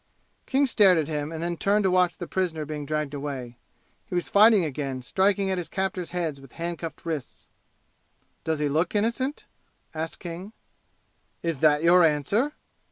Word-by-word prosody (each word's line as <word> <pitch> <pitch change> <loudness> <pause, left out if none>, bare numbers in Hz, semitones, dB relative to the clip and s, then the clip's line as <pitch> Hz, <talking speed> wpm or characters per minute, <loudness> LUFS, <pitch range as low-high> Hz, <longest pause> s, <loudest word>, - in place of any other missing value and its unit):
King 275 +1 +3
stared 205 -8 +5
at 155 -3 0
him 150 -1 -3
and 165 0 -5
then 175 0 -1
turned 205 +4 +2
to 190 - +2
watch 180 -1 +2
the 175 - -5
prisoner 170 -4 -2
being 150 -1 -5
dragged 150 -1 -2
away; 135 -4 -5 0.5
he 180 - -5
was 175 - -1
fighting 210 -3 +6
again, 135 -3 -4
striking 195 - +1
at 185 - 0
his 175 - -5
captors' 190 -2 -2
heads 165 -6 -3
with 135 -2 -15
handcuffed 170 -1 -5
wrists. 155 -5 -5 1.0
"Does 160 -1 -1
he 150 0 0
look 160 +7 0
innocent?" 235 +7 -1 0.5
asked 160 0 -4
King. 180 +5 -7 0.9
"Is 165 -5 -2
that 150 0 +4
your 175 +1 +6
answer?" 165 - +1
170 Hz, 165 wpm, -26 LUFS, 150-190 Hz, 1.0 s, fighting